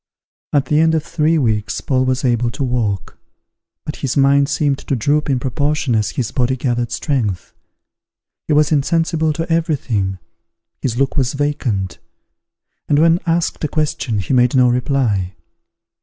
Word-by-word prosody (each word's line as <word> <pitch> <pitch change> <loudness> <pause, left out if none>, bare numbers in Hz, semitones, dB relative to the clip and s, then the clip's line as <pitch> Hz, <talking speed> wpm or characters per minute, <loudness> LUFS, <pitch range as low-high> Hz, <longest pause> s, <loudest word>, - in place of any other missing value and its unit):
At 145 -2 +2
the 150 - +2
end 160 0 +3
of 155 - 0
three 160 +1 +1
weeks 110 -7 0
Paul 130 -1 0
was 130 +1 0
able 120 -1 +1
to 135 - -4
walk; 110 -8 -2 0.7
but 150 - -5
his 135 0 -2
mind 140 0 +4
seemed 145 -2 0
to 140 - -2
droop 145 +6 0
in 130 -2 +1
proportion 140 +1 -1
as 105 -2 +1
his 120 -2 -3
body 130 0 0
gathered 120 -2 -1
strength. 110 - -2 0.9
He 155 - +1
was 150 +1 +3
insensible 160 +2 +1
to 165 +2 -3
every 165 -1 +1
thing; 100 -8 -2 0.6
his 120 -3 -2
look 135 +2 0
was 130 -3 +1
vacant; 135 - -2 0.9
and 145 - +3
when 165 +2 +4
asked 165 0 0
a - - +2
question, 150 -7 -1
he 100 +6 -2
made 125 0 +3
no 125 -1 +5
reply. 120 -7 0
135 Hz, 160 wpm, -18 LUFS, 120-150 Hz, 0.9 s, no